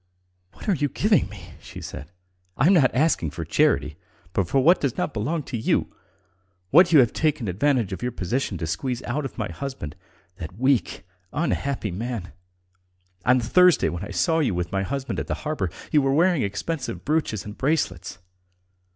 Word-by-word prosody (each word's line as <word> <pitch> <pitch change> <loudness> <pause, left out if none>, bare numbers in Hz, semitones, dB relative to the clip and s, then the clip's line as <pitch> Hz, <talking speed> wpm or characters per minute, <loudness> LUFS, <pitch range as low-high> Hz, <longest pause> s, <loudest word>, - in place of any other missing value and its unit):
"What - - -12
are 205 - +4
you 145 -3 0
giving 205 -1 +2
me?" 100 -4 -11
she - - -10
said. 75 +6 -8 0.5
"I 130 - +3
am 185 - +6
not 145 -9 +5
asking 130 - +1
for 85 +2 -6
charity, 80 - +1 0.4
but 95 -3 0
for 135 - +2
what 165 +8 +5
does 140 -2 -1
not - - -1
belong 145 +9 -2
to 125 - -5
you... 110 - 0 0.8
what 175 +4 +7
you 160 - +7
have 120 - +1
taken 150 -8 0
advantage 115 +2 +1
of - - -6
your 125 0 -1
position 105 +1 -2
to 80 - -3
squeeze 125 - -3
out 135 +4 -2
of 135 - -7
my 105 -2 -3
husband... 130 - -6 0.4
that 85 +3 -8
weak, 130 - +1 0.3
unhappy 140 - -1
man.... 110 0 -4 0.9
On 125 +1 +5
Thursday, 180 +9 +4
when 85 +2 -5
I - - -7
saw 100 - +1
you 130 - +1
with 90 -1 -3
my 95 - 0
husband 135 +6 -3
at - - -4
the - - -1
harbour 150 - -1 0.2
you 150 - +5
were 135 0 +1
wearing 175 -1 +3
expensive 130 +10 -3
brooches 145 - 0
and 105 0 -8
bracelets. 115 - -1
125 Hz, 185 wpm, -24 LUFS, 95-150 Hz, 0.9 s, what